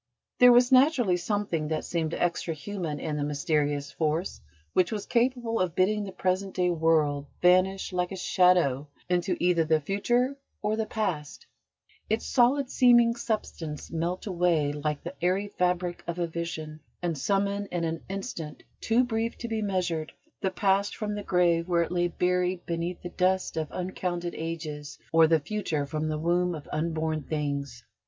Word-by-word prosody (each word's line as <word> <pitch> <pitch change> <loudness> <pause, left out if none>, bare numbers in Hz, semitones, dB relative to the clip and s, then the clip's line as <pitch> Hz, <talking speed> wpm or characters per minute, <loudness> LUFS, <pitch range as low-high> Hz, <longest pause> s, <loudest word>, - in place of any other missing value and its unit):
There 250 0 +9
was 245 +1 +5
naturally 255 - +5
something 175 -4 -1
that 155 0 -2
seemed 165 -2 -2
extra 170 -1 -1
human 165 -2 -4
in 155 -2 -3
the 145 - -1
mysterious 145 -1 0
force 160 +3 -2 0.3
which 180 -2 +3
was 210 -2 -3
capable 240 -1 +1
of 180 -2 0
bidding 210 +3 +2
the 195 - -6
present 190 +1 -1
day 180 -1 +2
world 155 -4 +2
vanish 185 +2 +3
like 180 0 -1
a - - -4
shadow 180 -7 +3 0.2
into 180 0 +1
either 175 -2 +3
the 160 0 +2
future 240 - 0 0.3
or 210 +1 +1
the 220 0 -2
past, 180 -10 -3 0.6
its 220 +1 0
solid 255 +2 +3
seeming 240 -2 +5
substance 195 -10 -4
melt 170 +3 -2
away 170 -6 +1
like 150 0 -3
"the 175 - -6
airy 190 +3 +1
fabric 180 -2 -1
of 170 0 -3
a 175 - 0
vision," 160 -2 -5 0.2
and 170 -2 0
summon 200 +6 0
in 175 -2 -3
an 165 0 -2
instant, 190 -6 -6 0.2
too 230 +3 +3
brief 230 -1 -2
to 235 - -5
be 225 -1 -2
measured, 180 -6 -1 0.3
the 190 - +1
past 195 +1 +1
from 210 -1 -3
the 205 - -3
grave 175 -3 +2
where 170 -2 +3
it 170 - -6
lay 175 0 +1
buried 180 0 0
beneath 170 +1 -3
the 175 - -4
dust 185 0 0
of 160 -2 -3
uncounted 175 -1 -3
ages, 155 -3 -5
or 165 0 +6
the 160 0 +4
future 160 -4 -2
from 155 +2 -3
the 155 0 -1
womb 175 +2 +1
of 150 - -9
unborn 160 0 -1
things. 140 -4 -3
175 Hz, 170 wpm, -27 LUFS, 160-200 Hz, 0.6 s, There